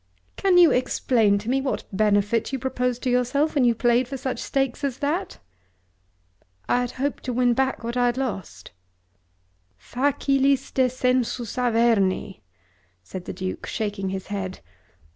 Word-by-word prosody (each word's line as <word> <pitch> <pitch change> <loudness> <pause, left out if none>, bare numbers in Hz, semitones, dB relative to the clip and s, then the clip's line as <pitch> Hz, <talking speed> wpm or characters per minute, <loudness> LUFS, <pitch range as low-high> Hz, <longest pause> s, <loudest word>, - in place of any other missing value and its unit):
"Can 380 -2 +3
you 345 -2 +7
explain 230 -4 +2
to 205 +2 -7
me 265 +2 +1
what 265 - -2
benefit 210 +3 +1
you 270 - -1
proposed 250 -1 -2
to 255 - +1
yourself 255 +5 +1
when 280 - +2
you 235 -1 +3
played 240 +1 +2
for 270 +1 -5
such 255 -2 -4
stakes 270 0 -1
as 270 -3 -1
that?" 315 +8 -2 1.3
"I 245 0 +1
hoped 270 +4 -3
to 250 - -2
win 245 0 +3
back 265 0 -1
what 235 +1 -4
I 245 0 +3
had 240 +1 -1
lost." 190 - -5 1.1
"Facilis 275 - +1
descensus 250 -2 0
Averni!" 225 - +1 0.6
said 180 - -8
the - - -5
Duke, 185 0 -5
shaking 205 -3 -3
his 190 0 -4
head. 190 -2 -4
245 Hz, 145 wpm, -24 LUFS, 215-265 Hz, 1.3 s, you